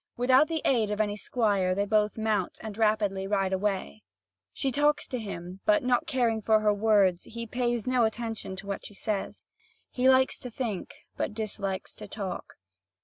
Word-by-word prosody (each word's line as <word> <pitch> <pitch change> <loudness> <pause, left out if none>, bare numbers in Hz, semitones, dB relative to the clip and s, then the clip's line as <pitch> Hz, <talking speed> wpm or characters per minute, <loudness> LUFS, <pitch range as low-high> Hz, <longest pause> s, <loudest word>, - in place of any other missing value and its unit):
Without 260 +4 +5
the 325 -2 -2
aid 225 -5 +3
of 210 0 -2
any 205 -1 +1
squire, 200 -5 +1
they 200 +1 +1
both 210 +1 +1
mount, 215 -4 0
and 215 -2 -6
rapidly 210 -3 +1
ride 195 -2 +1
away. 200 +2 -2 0.5
She 270 - -2
talks 295 +3 +2
to 250 - -4
him, 185 -3 -7
but 315 -2 +3
not 250 +3 +1
caring 240 -6 +1
for 220 +1 +4
her 210 -1 +3
words, 200 -4 +3
he 235 0 -6
pays 240 -1 -1
no 255 -1 +2
attention 225 -3 -2
to 195 - -7
what 200 -1 -4
she 205 - -10
says. 205 -1 -3 0.5
He 255 +1 +3
likes 260 0 +4
to 250 - -7
think, 225 -5 -4 0.2
but - - -2
dislikes 200 -3 -4
to - - -10
talk. 195 -4 -6
215 Hz, 180 wpm, -28 LUFS, 200-245 Hz, 0.5 s, Without